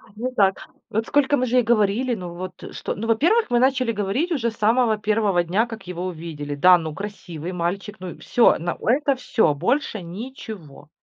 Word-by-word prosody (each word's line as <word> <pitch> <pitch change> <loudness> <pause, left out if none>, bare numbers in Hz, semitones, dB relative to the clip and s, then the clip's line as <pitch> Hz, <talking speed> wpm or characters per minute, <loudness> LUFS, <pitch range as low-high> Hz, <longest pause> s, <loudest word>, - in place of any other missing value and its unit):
не 245 +4 -3
так. 195 -6 +1 0.2
Вот 220 +2 -1
сколько 290 0 +3
мы 255 - +1
же 250 +1 +1
ей 250 - +5
говорили, 230 +2 +2
ну 180 -4 -7
вот 180 +1 -8
что? - - -4
Ну, 225 +2 -4
во-первых, 335 - +3
мы 240 -1 +3
начали 255 -2 +2
говорить 215 - -1
уже 240 -8 0
с - - -15
самого 225 +1 +3
1 210 -3 +1
дня, 190 +7 +1
как 225 -5 -10
его 180 0 -4
увидели. 155 -5 -5
Да, 180 +5 +6
ну 160 -2 -5
красивый 180 -4 -7
мальчик. 185 +4 -3
Ну 185 0 -6
и - - -12
всё, 240 - +4
но 175 +1 -3
это 275 +3 +3
всё, 240 - +1
больше 215 - -1
ничего. 185 - -9
210 Hz, 195 wpm, -23 LUFS, 180-245 Hz, 0.2 s, Да